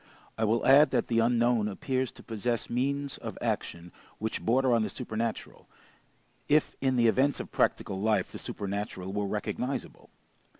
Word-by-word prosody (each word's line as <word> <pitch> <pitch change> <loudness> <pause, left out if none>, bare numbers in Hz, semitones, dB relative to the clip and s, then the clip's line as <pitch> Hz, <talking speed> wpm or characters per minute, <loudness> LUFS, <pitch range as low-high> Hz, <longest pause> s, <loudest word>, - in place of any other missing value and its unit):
I 110 - 0
will 115 +2 +1
add 145 +3 +7
that - - 0
the 115 -1 +2
unknown 115 -1 +3
appears 130 +5 -2
to - - -14
possess 115 +2 -2
means 140 +3 -1
of - - -7
action 85 +1 -3 0.3
which 110 +1 -3
border 130 +2 +3
on 115 - +3
the 110 - -1
supernatural, 115 -2 -4 0.8
if 150 +1 +3
in 130 -1 +2
the 120 -1 +3
events 135 +5 +2
of - - -6
practical 95 - 0
life 105 -2 +1
the - - -7
supernatural 100 -2 -4
were 105 0 -1
recognizable. 125 +5 -4
115 Hz, 160 wpm, -29 LUFS, 105-130 Hz, 0.8 s, add